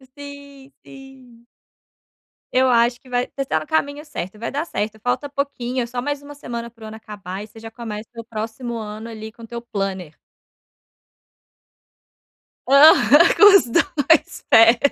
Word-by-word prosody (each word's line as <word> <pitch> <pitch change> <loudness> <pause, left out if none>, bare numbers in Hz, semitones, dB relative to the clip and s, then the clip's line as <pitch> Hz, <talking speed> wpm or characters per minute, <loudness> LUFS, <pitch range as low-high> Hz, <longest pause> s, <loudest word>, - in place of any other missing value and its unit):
Sim, 280 -1 -12
sim. 260 -3 -16 1.1
Eu 260 0 +4
acho 240 0 +2
que 255 - -19
vai 245 0 -1
você 275 - -2
tá 155 - 0
no 155 - -9
caminho 295 -1 -2
certo. 210 - -7
Vai 230 - -5
dar 290 +3 -2
certo, 215 -8 -4
falta 250 +4 -1
pouquinho, 265 -3 -3
é - - -2
só 245 +1 -5
mais 290 0 -3
uma 290 0 -12
semana 235 -4 -7
para 230 -1 -18
o - - -7
ano 220 0 -9
acabar 200 -3 -8
e - - -11
você 225 +1 -15
já 225 0 -10
começa 220 -2 -7
o 230 - -7
próximo 230 +2 -6
ano 215 +1 -7
ali 220 -1 -9
com 230 - -16
teu 235 +1 -7
planner. 195 -8 -5 2.5
Aham, 300 +3 +6
com 410 -1 +8
os - - -1
2 320 +2 +1
pés. 230 +1 +7
240 Hz, 165 wpm, -21 LUFS, 220-280 Hz, 2.5 s, com